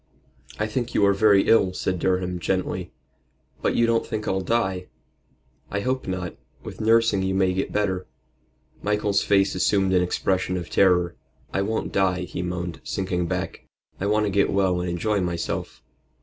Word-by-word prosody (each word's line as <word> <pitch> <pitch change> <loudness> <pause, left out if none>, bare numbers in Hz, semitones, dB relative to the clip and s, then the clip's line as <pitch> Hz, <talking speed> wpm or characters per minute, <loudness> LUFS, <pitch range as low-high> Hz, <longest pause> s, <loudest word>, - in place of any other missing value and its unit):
"I 105 - 0
think 120 +2 -3
you 100 - +4
are 100 - +4
very 100 -1 +4
ill," 95 -5 +4
said 90 0 -2
Durham, 90 0 0
gently. 95 +1 -2 0.7
"But - - +1
you 120 - +4
don't 115 0 +2
think 110 -2 -4
I'll 95 0 0
die?" 95 -3 -1 0.8
"I 100 - -2
hope 130 +3 -2
not. 90 -2 -3 0.3
With - - -8
nursing 115 -2 +3
you 95 0 0
may 95 -1 +2
get 95 - -2
better." 95 -3 -1 0.7
Michael's 105 -1 +1
face 100 -1 +3
assumed 95 0 +2
an 90 - +4
expression 90 +1 0
of 85 -2 -6
terror. 90 -2 +3 0.4
"I 95 - +1
won't 110 +3 -2
die," 95 -2 +2
he 90 0 -5
moaned, 90 -1 -4
sinking 90 -2 -2
back. - - -4 0.3
"I 100 - -1
want 105 +1 +2
to 100 - -1
get 100 +1 +2
well 95 -2 +2
and 90 - -2
enjoy 100 +4 0
myself." 85 -2 -3
95 Hz, 170 wpm, -24 LUFS, 90-105 Hz, 0.8 s, you